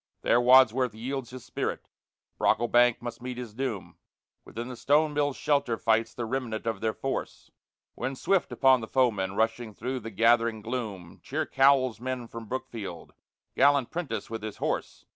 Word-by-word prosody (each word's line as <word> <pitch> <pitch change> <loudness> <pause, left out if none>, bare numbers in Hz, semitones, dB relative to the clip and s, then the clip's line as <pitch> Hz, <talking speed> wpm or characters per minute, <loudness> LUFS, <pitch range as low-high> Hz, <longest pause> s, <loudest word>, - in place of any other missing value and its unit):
There 120 - +4
Wadsworth 125 -2 +5
yields 130 +2 -4
his 125 -1 -10
spirit, - - -4 0.5
Brocklebank 120 0 +3
must 120 0 -6
meet 125 0 -5
his 120 -4 -7
doom; 120 -5 -4 0.5
Within 115 +2 -7
the 130 - -7
stone 150 +4 +2
mill's 145 -2 0
shelter 140 -6 +1
fights 115 0 +1
the 120 - -3
remnant 115 -2 -3
of 115 -1 -2
their 110 -1 -1
force; 135 - -5 0.4
When 135 +1 -4
swift 190 +7 +1
upon 130 -2 +4
the 110 - -6
foemen, 105 -8 +1
rushing 115 0 -1
through 130 +3 -3
the 115 - -7
gathering 115 +1 +2
gloom, 105 -8 -5
Cheer 155 +3 -2
Cowell's 135 -4 +3
men 130 -1 -4
from 115 -1 -9
Brookfield, 105 -7 -6 0.4
gallant 140 -3 +4
Prentice 170 -3 -4
with 115 -1 -6
his 110 -1 -6
horse! - - -3
120 Hz, 160 wpm, -28 LUFS, 115-130 Hz, 0.5 s, Wadsworth